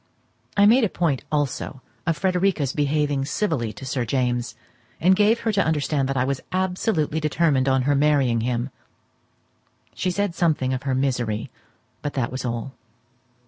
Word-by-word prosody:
I 200 Hz, -, +6 dB
made 235 Hz, +5 st, +6 dB
a 215 Hz, -, +2 dB
point 160 Hz, -8 st, 0 dB
also 145 Hz, -2 st, -2 dB, 0.2 s
of 165 Hz, -2 st, +1 dB
Frederica's 180 Hz, -5 st, +1 dB
behaving 145 Hz, -1 st, +1 dB
civilly 140 Hz, -, -1 dB
to 135 Hz, -, -9 dB
Sir 130 Hz, -1 st, -1 dB
James, 120 Hz, -1 st, -1 dB, 0.4 s
and 185 Hz, +3 st, +5 dB
gave 210 Hz, +3 st, +3 dB
her 225 Hz, -, +1 dB
to 200 Hz, -2 st, +2 dB
understand 150 Hz, -3 st, 0 dB
that 135 Hz, -, -1 dB
I 125 Hz, -, +3 dB
was 135 Hz, 0 st, -2 dB
absolutely 185 Hz, -4 st, 0 dB
determined 150 Hz, -3 st, +2 dB
on 130 Hz, -1 st, +2 dB
her 145 Hz, +2 st, +2 dB
marrying 140 Hz, -5 st, +3 dB
him. 120 Hz, +2 st, -1 dB, 1.2 s
She 185 Hz, -, -1 dB
said 200 Hz, 0 st, -1 dB
something 155 Hz, -7 st, +1 dB
of 130 Hz, -, -2 dB
her 130 Hz, -, +1 dB
misery, 125 Hz, -5 st, -1 dB, 0.5 s
but 145 Hz, -, -4 dB
that 130 Hz, -4 st, -1 dB
was 130 Hz, -, -4 dB
all. 120 Hz, +2 st, -3 dB
145 Hz, 160 wpm, -23 LUFS, 130-170 Hz, 1.2 s, I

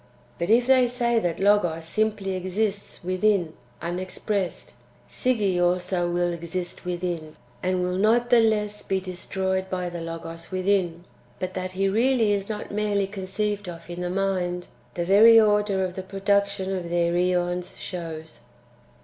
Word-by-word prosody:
But 170 Hz, -, -1 dB
if 235 Hz, +2 st, +5 dB
they 255 Hz, -1 st, +5 dB
say 240 Hz, -1 st, +1 dB
that 175 Hz, -6 st, -2 dB
Logos 180 Hz, -5 st, +2 dB
simply 210 Hz, +1 st, 0 dB
exists 195 Hz, +2 st, -2 dB
within^ 185 Hz, -2 st, +2 dB, 0.3 s
(unexpressed), 185 Hz, +2 st, -3 dB, 0.3 s
Sige 205 Hz, -8 st, 0 dB
also 175 Hz, 0 st, +1 dB
will 175 Hz, 0 st, +1 dB
exist 175 Hz, +2 st, -5 dB
within, 175 Hz, -3 st, -3 dB, 0.3 s
and 185 Hz, 0 st, 0 dB
will 180 Hz, +1 st, -1 dB
not 235 Hz, +4 st, +3 dB
the 240 Hz, -, +7 dB
less 210 Hz, -2 st, +1 dB
be 190 Hz, -1 st, -1 dB
destroyed 190 Hz, +1 st, -3 dB
by 180 Hz, -1 st, -2 dB
the 170 Hz, -1 st, -6 dB
Logos 165 Hz, 0 st, -7 dB
within. 185 Hz, -3 st, 0 dB, 0.3 s
But 185 Hz, 0 st, -4 dB
that 185 Hz, 0 st, -4 dB
he 195 Hz, +1 st, +1 dB
really 230 Hz, +2 st, +3 dB
is 200 Hz, 0 st, -2 dB
not 210 Hz, -1 st, -5 dB
merely 205 Hz, -1 st, +1 dB
conceived 200 Hz, 0 st, -3 dB
of 170 Hz, -1 st, -9 dB
in 175 Hz, +1 st, -5 dB
the 180 Hz, -, -2 dB
mind, 180 Hz, -2 st, -1 dB, 0.3 s
the 175 Hz, -, -1 dB
very 220 Hz, +5 st, +8 dB
order 210 Hz, -2 st, +3 dB
of 185 Hz, -1 st, -2 dB
the 190 Hz, -, -5 dB
production 195 Hz, 0 st, 0 dB
of 175 Hz, -2 st, -4 dB
their 170 Hz, 0 st, +1 dB
(iEons) 180 Hz, 0 st, 0 dB
shows. 160 Hz, -7 st, -7 dB
185 Hz, 150 wpm, -25 LUFS, 175-205 Hz, 0.3 s, very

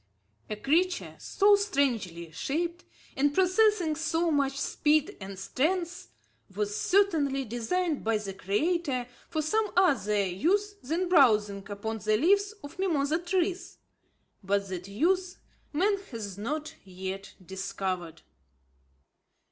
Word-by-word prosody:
A 215 Hz, -, -2 dB
creature 340 Hz, -, +1 dB
so 410 Hz, +1 st, +4 dB
strangely 235 Hz, -, -1 dB
shaped, 335 Hz, -, -3 dB, 0.3 s
and 285 Hz, +2 st, +2 dB
possessing 370 Hz, -3 st, +3 dB
so 325 Hz, +1 st, 0 dB
much 275 Hz, -2 st, +1 dB
speed 300 Hz, 0 st, +1 dB
and 190 Hz, 0 st, -7 dB
strength, 345 Hz, -, -1 dB, 0.5 s
was 205 Hz, 0 st, -1 dB
certainly 315 Hz, -, +2 dB
designed 290 Hz, -, -1 dB
by 225 Hz, 0 st, +2 dB
the 200 Hz, -2 st, -5 dB
Creator 260 Hz, -, 0 dB, 0.2 s
for 315 Hz, -2 st, -1 dB
some 425 Hz, +6 st, +1 dB
other 210 Hz, -, +3 dB
use 370 Hz, -, +1 dB
than 330 Hz, +8 st, -1 dB
browsing 210 Hz, -, +3 dB
upon 220 Hz, +2 st, -4 dB
the 215 Hz, 0 st, +2 dB
leaves 400 Hz, -, +3 dB
of 285 Hz, +5 st, -10 dB
mimosa 315 Hz, -4 st, +1 dB
trees; 355 Hz, +1 st, -1 dB, 0.7 s
but 200 Hz, 0 st, 0 dB
that 180 Hz, 0 st, -5 dB
use, 360 Hz, -, 0 dB, 0.3 s
man 395 Hz, +6 st, +2 dB
has 210 Hz, -6 st, -6 dB
not 295 Hz, +10 st, -4 dB
yet 190 Hz, +1 st, -7 dB
discovered. 185 Hz, -3 st, -4 dB
285 Hz, 115 wpm, -28 LUFS, -, 0.7 s, so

